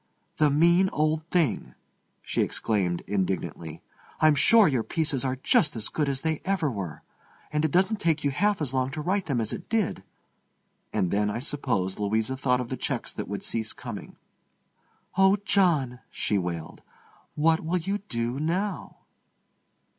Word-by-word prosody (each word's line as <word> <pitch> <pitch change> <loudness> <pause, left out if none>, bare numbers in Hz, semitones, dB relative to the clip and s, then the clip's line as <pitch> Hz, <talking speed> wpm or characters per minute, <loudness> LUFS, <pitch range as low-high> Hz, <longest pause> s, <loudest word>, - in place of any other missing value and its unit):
"The 150 - +4
mean 170 +6 +4
old 155 +1 0
thing!" 170 -8 0 0.5
she - - -1
exclaimed 95 -6 0
indignantly. 95 -4 -3 0.4
"I'm 155 -1 +6
sure 220 +8 +6
your 130 -5 +1
pieces 150 0 -1
are 130 -1 0
just 165 - +2
as 110 -1 -1
good 150 -3 0
as 135 -1 -3
they 160 -1 -1
ever 185 -7 0
were. 95 - -6 0.5
And 150 0 +1
it 160 - +2
doesn't 190 +7 +2
take 160 -5 +1
you 140 - +1
half 205 +4 +1
as 135 -3 -2
long 130 0 +1
to 150 - -3
write 185 +4 -1
them 135 -5 0
as 110 -1 -2
it - - -7
did." 215 - 0 0.9
And 95 -5 0
then, 105 +1 +1
I 105 - -2
suppose, 120 -9 -2
Louisa 110 +5 0
thought 125 -1 +1
of 120 - -6
the 130 - -3
checks - - -3
that - - -5
would - - -5
cease 110 -1 -2
coming. 125 -7 -8 1.0
"Oh, 190 +1 +6
John," 155 - +2
she 105 - 0
wailed, 85 -3 -5 0.5
"what 160 +2 +3
will 170 +3 0
you 195 +4 -2
do 120 - -3
now?" 180 +7 -2
145 Hz, 165 wpm, -27 LUFS, 115-170 Hz, 1.0 s, I'm